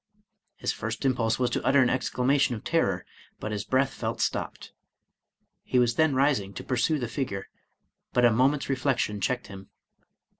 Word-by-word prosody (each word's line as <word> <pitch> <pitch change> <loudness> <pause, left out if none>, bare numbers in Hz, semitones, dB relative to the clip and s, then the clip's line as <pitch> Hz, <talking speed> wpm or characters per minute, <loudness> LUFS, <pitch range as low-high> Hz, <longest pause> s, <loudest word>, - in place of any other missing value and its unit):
His - - -2
first - - -4
impulse 115 -4 +1
was 125 -1 0
to - - -1
utter 140 +1 +4
an 125 -2 +4
exclamation 130 0 +1
of 110 - -9
terror, 95 - 0 0.3
but 110 - -4
his 105 -1 -2
breath 130 +5 +1
felt - - -4
stopped. - - -3 0.9
He 130 - -1
was 120 -1 +3
then 155 +2 +2
rising 130 -8 +1
to - - -6
pursue 130 +5 +1
the 125 -4 -3
figure, 110 -5 -4 0.6
but 125 0 +3
a 120 - +6
moment's 135 +5 +2
reflection 130 -6 0
checked 125 +5 -1
him. 95 -1 -11
125 Hz, 165 wpm, -27 LUFS, 110-135 Hz, 0.9 s, a